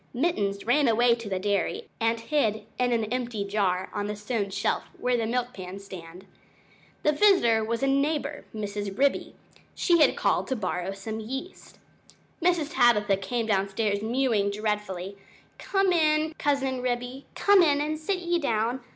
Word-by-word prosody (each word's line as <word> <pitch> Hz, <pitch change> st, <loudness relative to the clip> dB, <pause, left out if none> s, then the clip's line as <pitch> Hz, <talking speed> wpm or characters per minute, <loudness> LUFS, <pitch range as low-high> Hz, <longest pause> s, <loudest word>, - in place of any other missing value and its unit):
Mittens 205 Hz, -, 0 dB
ran 280 Hz, +4 st, +3 dB
away 235 Hz, +1 st, +4 dB
to 230 Hz, -3 st, -5 dB
the 190 Hz, -, -1 dB
dairy 205 Hz, -, -1 dB
and 230 Hz, 0 st, +1 dB
hid 225 Hz, -5 st, 0 dB
in 250 Hz, 0 st, +2 dB
an 230 Hz, -2 st, +1 dB
empty 240 Hz, -5 st, -2 dB
jar 195 Hz, -2 st, 0 dB
on 205 Hz, -1 st, -2 dB
the 210 Hz, -, -3 dB
stone 210 Hz, -1 st, -2 dB
shelf 190 Hz, -, -1 dB
where 250 Hz, 0 st, +1 dB
the 230 Hz, -2 st, 0 dB
milk 245 Hz, +1 st, -1 dB
pans 185 Hz, +1 st, -8 dB
stand. 180 Hz, -2 st, -10 dB, 0.8 s
The 300 Hz, -, +4 dB
visitor 295 Hz, -, +4 dB
was 230 Hz, +3 st, -2 dB
a -, -, +3 dB
neighbor, 285 Hz, +1 st, 0 dB
Mrs. 205 Hz, -2 st, -5 dB
Ribby; 280 Hz, +1 st, +1 dB, 0.4 s
she 345 Hz, -2 st, +3 dB
had -, -, +4 dB
called -, -, +1 dB
to 260 Hz, -, -1 dB
borrow 185 Hz, -3 st, -2 dB
some 215 Hz, +3 st, -6 dB
yeast. 265 Hz, -, -7 dB, 0.6 s
Mr. 340 Hz, -3 st, +2 dB
Tabitha 225 Hz, -8 st, +3 dB
came 230 Hz, +4 st, -2 dB
downstairs 200 Hz, 0 st, 0 dB
mewing 225 Hz, -3 st, +1 dB
dreadfully 200 Hz, -2 st, -3 dB, 0.4 s
"Come 390 Hz, -2 st, +1 dB
in, 310 Hz, -1 st, +2 dB
Cousin 270 Hz, -3 st, 0 dB
Ribby, 250 Hz, +2 st, -3 dB
come 405 Hz, -1 st, +5 dB
in, 290 Hz, -4 st, +3 dB
and 305 Hz, +1 st, -2 dB
sit 370 Hz, +5 st, -1 dB
ye 345 Hz, -1 st, 0 dB
down! 235 Hz, -3 st, 0 dB
235 Hz, 160 wpm, -27 LUFS, 205-285 Hz, 0.8 s, come